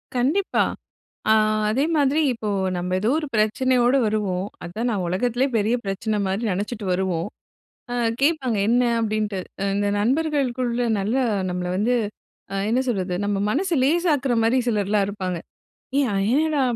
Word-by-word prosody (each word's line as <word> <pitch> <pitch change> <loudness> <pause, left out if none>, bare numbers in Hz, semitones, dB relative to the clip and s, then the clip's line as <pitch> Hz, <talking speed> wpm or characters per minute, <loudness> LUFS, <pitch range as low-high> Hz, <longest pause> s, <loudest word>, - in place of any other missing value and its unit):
கண்டிப்பா. 295 +11 +2 0.7
ஆ - - +7 0.4
அதே 260 +6 +1
மாதிரி 290 +1 +3
இப்போ 225 -3 -5 0.3
நம்ப 175 +1 -3
எதோ 215 +4 +1
ஒரு 305 - -3
பிரச்சனையோடு 245 +4 +3
வருவோம். 200 -3 -1 0.2
அதா 175 +6 -5
நா - - 0
உலகத்திலே 245 +8 0
பெரிய 220 +3 +2
பிரச்சனை 200 +2 -2
மாரி 190 +4 -1
நெனைச்சுட்டு 205 +3 -3
வருவோம். 180 -2 -1 0.7
அ - - -2 0.3
கேப்பாங்க 275 -6 +2
"என்ன?" 245 +2 +3 0.2
அப்படின்ட்டு. 215 -3 -1 0.2
அ - - 0
இந்த 205 0 0
நண்பர்களுக்குள்ள 255 -1 0 0.2
நல்ல 205 +5 -1 0.3
நம்மள 180 0 -3
வந்து 230 +5 +2 0.6
அ - - -2
என்ன 250 +3 +2
சொல்றது? 185 -6 -1
நம்ம 205 -1 0
மனசு 345 - 0
லேசாக்குற 295 -3 +2
மாரி 240 +3 +3
சிலர்லாம் 205 -2 +1
இருப்பாங்க. 185 -3 -3 0.6
"ஏய், 280 -2 +3
அய்யடா! 285 +9 +2
225 Hz, 140 wpm, -23 LUFS, 200-260 Hz, 0.7 s, ஆ